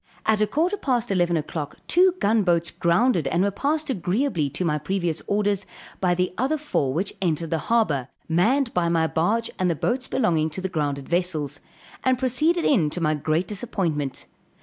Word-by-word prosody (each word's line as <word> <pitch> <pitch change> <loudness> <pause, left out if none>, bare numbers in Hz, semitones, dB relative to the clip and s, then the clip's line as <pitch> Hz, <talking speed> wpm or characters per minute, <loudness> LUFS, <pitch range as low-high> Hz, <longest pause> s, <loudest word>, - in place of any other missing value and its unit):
At 215 -1 +2
a 215 - +3
quarter 335 - 0
past 245 - -1
11 175 -3 +2
o'clock, 150 -1 -4
two 365 +1 +4
gun 220 - +2
boats 170 -3 +1
grounded 170 - +2
and 170 +3 +1
were 200 - +1
passed 300 +9 -1
agreeably 180 - 0
to 160 +6 -3
my 150 -2 +1
previous 175 0 -2
orders, 205 -1 +1 0.4
by 180 -2 +2
the 180 +1 -1
other 275 +5 +1
four 285 - -1
which 180 +8 -2
entered 165 -3 -1
the 165 - +1
harbor, 165 - +2 0.2
manned 230 +11 +2
by 170 -1 +1
my 165 -1 +2
barge 210 +9 0
and 185 -1 +2
the 170 - +1
boats 250 - -1
belonging 165 -10 +1
to 175 +5 -6
the 190 - -2
grounded 145 -5 -2
vessels, 160 -5 -1 0.4
and 260 -1 +3
proceeded 305 +7 +1
in 175 - +3
to 180 - -4
my 155 -2 +1
great 155 +4 0
disappointment. 175 - -3
180 Hz, 185 wpm, -24 LUFS, 160-235 Hz, 0.4 s, two